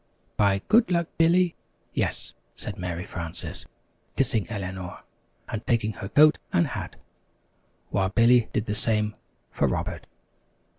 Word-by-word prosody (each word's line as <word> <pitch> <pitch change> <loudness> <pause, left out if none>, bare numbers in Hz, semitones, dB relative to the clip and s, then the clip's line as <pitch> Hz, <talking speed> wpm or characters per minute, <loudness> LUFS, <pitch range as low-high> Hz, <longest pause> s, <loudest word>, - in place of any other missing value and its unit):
"By 100 -1 +2
good 230 +1 +5
luck, 170 -2 +1
Billy, 175 +1 +4 0.4
yes," - - -2 0.2
said - - -7
Mary 90 0 -3
Frances, 85 -3 -7 0.5
kissing 115 -6 +1
Eleanor, 95 -4 -5 0.4
and 110 0 -4
taking 110 -2 +2
her 95 - -7
coat 155 +1 +6
and 175 -2 +3
hat, 105 -7 -5 1.0
while 95 -1 +1
Billy 115 +3 +4
did 110 - -1
the 105 - -2
same 105 -1 0 0.4
for - - +1
Robert. - - -3
110 Hz, 130 wpm, -26 LUFS, 95-140 Hz, 1.0 s, coat